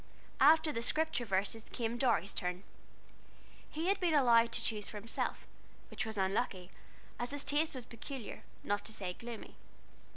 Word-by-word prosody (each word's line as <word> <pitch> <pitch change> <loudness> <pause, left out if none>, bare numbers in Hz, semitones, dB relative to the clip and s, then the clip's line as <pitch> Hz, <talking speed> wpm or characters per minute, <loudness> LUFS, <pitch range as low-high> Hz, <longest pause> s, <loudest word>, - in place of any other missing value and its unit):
After 315 +2 +6
the 230 - -2
"Scripture 310 0 +1
Verses," 200 +2 -1
came 235 0 -2
Dorry's 230 -8 +2
turn. 180 +1 -3 1.1
He 315 +2 -3
had 390 +1 +3
been 345 -4 +2
allowed 235 -4 +6
to - - +1
choose 210 -2 -2
for 210 - -7
himself, 220 +3 -2 0.5
which - - -3
was 220 -1 -4
unlucky, 190 -1 0 0.5
as 240 - -1
his 285 0 -2
taste 295 +1 +2
was 250 -3 -6
peculiar, 240 0 -7 0.2
not 205 0 0
to 220 - -5
say 190 -4 -3
gloomy. 235 +2 -8
230 Hz, 160 wpm, -34 LUFS, 205-280 Hz, 1.1 s, After